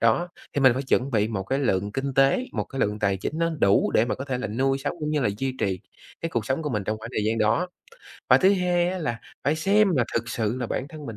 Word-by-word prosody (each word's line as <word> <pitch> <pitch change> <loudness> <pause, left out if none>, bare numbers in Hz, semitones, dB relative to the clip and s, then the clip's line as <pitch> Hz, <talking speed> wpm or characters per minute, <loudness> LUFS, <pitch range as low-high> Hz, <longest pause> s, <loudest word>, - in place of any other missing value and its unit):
Đó, 115 +11 +2 0.2
thì 140 - -1
mình 130 -2 +7
phải 130 - -2
chuẩn 135 0 +1
bị 110 -2 +1
một 100 -4 -2
cái 135 +8 -1
lượng 100 -6 0
kinh 135 +1 -3
tế, 135 - +3
một - - -2
cái 135 - -6
lượng 105 +1 0
tài 100 -2 +1
chính 150 +11 -4
nó 165 0 +1
đủ 100 0 +4
để 110 - +4
mà - - -1
có 135 - -5
thể 130 -3 -2
là - - -3
nuôi 135 +5 0
sống 145 +4 -3
cũng 150 0 -2
như 150 - +1
là 120 - +2
duy 135 0 -2
trì 95 -2 0 0.4
cái 165 - -2
cuộc 115 -3 -2
sống 130 +5 -1
của 150 - -2
mình 105 -5 -2
trong 110 +1 -2
khoảng 115 +2 -8
thời 105 - 0
gian 110 +1 0
đó. 115 +12 +2 0.6
Và - - +8
thứ 190 +2 +5
hai 175 -1 +1
á 185 - -3
là 120 -8 -3 0.2
phải 150 +3 +2
xem 200 +5 +3
là 120 - +3
thực 115 0 -1
sự 115 0 -1
là 120 - -1
bản 130 - -3
thân 155 -2 -9
mình 110 -2 -6
130 Hz, 290 wpm, -25 LUFS, 110-150 Hz, 0.6 s, Và